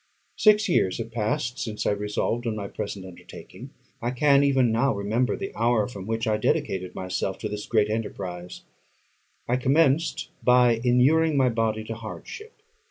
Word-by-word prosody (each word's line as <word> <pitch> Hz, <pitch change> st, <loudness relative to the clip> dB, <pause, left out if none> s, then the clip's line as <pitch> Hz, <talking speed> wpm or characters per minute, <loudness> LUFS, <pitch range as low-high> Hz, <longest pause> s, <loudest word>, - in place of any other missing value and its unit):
Six 215 Hz, 0 st, +4 dB
years 95 Hz, -, +1 dB
have 115 Hz, 0 st, -6 dB
passed 115 Hz, +3 st, -2 dB
since 110 Hz, -6 st, -4 dB
I -, -, +2 dB
resolved 105 Hz, +3 st, -2 dB
on 110 Hz, -, -1 dB
my 100 Hz, -2 st, -5 dB
present 100 Hz, -2 st, -6 dB
undertaking. 95 Hz, -2 st, -12 dB, 0.3 s
I 120 Hz, -, -1 dB
can, 140 Hz, +2 st, +3 dB
even 135 Hz, -4 st, +3 dB
now, 115 Hz, +2 st, +1 dB
remember 110 Hz, +5 st, 0 dB
the 195 Hz, 0 st, -6 dB
hour 115 Hz, -2 st, +2 dB
from 100 Hz, -5 st, -9 dB
which 115 Hz, 0 st, -1 dB
I 110 Hz, -1 st, +1 dB
dedicated 95 Hz, -3 st, -1 dB
myself 95 Hz, +1 st, -3 dB
to 110 Hz, -, -4 dB
this 105 Hz, 0 st, -6 dB
great 110 Hz, -3 st, +2 dB
enterprise. 90 Hz, -5 st, -5 dB, 0.8 s
I 125 Hz, -, +1 dB
commenced 150 Hz, +3 st, +2 dB
by 125 Hz, -2 st, +4 dB
inuring 145 Hz, +6 st, +3 dB
my 130 Hz, -2 st, +4 dB
body 110 Hz, -2 st, -1 dB
to 115 Hz, -, -5 dB
hardship. 395 Hz, -, -10 dB
115 Hz, 165 wpm, -25 LUFS, 105-130 Hz, 0.8 s, Six